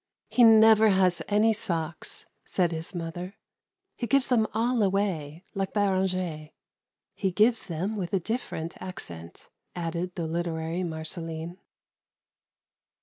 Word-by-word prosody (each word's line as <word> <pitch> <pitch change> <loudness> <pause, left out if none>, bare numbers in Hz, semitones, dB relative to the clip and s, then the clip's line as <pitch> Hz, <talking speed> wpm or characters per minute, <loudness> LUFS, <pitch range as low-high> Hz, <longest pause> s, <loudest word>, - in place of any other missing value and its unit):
"He 245 - +4
never 220 -1 +7
has 185 -3 +3
any 215 +2 +3
socks," 165 -7 -2 0.2
said 175 -3 0
his 165 +3 -5
mother; 175 +3 -5 0.6
"he 235 - -3
gives 275 0 +2
them 225 -4 +3
all 235 +2 +1
away, 185 -6 -1
like 195 -1 -2
Beranger." 185 -6 0 0.6
"He 195 - -1
gives 225 +5 +3
them 185 +6 -2
with 185 -4 -3
a 195 - +2
different 175 -5 -4
accent," 85 - -7 0.3
added 175 +1 -3
the 170 - -2
literary 165 +1 -2
Marceline. 165 +1 -5
180 Hz, 120 wpm, -27 LUFS, 165-210 Hz, 0.6 s, never